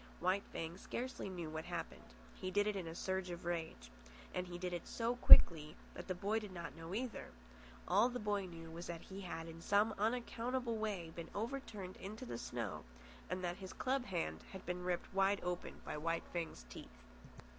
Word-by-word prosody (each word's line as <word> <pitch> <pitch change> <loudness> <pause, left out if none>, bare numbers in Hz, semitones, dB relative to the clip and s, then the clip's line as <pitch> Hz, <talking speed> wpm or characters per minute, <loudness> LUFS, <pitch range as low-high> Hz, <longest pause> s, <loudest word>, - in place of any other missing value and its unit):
White 185 +3 +3
Fang 165 +3 -4
scarcely 255 -3 -3
knew 175 -4 -4
what 160 0 -4
happened. - - -5 0.2
He 185 - -4
did 205 +2 +3
it 210 -1 +1
in 185 -4 -3
a 165 - -5
surge 190 0 -1
of 175 0 -5
rage. 160 - -3 0.4
And 180 0 -1
he 175 0 -5
did 180 0 -2
it 175 - -4
so 235 +1 0
quickly 155 -9 +9 0.2
that - - -7
the 185 - -1
boy 205 +5 +1
did 210 -3 -7
not 175 -2 -6
know 165 +3 -5
either. 245 +1 -2 0.6
All 245 - +5
the 250 - -3
boy 205 -4 0
knew 165 -2 -8
was 170 +2 -6
that 170 -1 -4
he 195 +1 -7
had 165 -3 -4
in 165 0 -8
some 205 +4 +4
unaccountable 240 +2 0
way 195 -7 -2
been 170 -1 -5
overturned 215 -5 -3
into 215 +6 -6
the 120 - -4
snow, 105 -13 -3 0.5
and 185 - -2
that 175 0 -1
his 190 -2 -7
club 260 0 +1
hand 165 - -1
had 190 - -7
been 180 0 -2
ripped 180 +1 -1
wide 195 +1 +4
open 180 0 -3
by - - -3
White 165 +2 0
Fang's 165 - -3
teeth. 60 0 -11
180 Hz, 200 wpm, -38 LUFS, 165-210 Hz, 0.6 s, quickly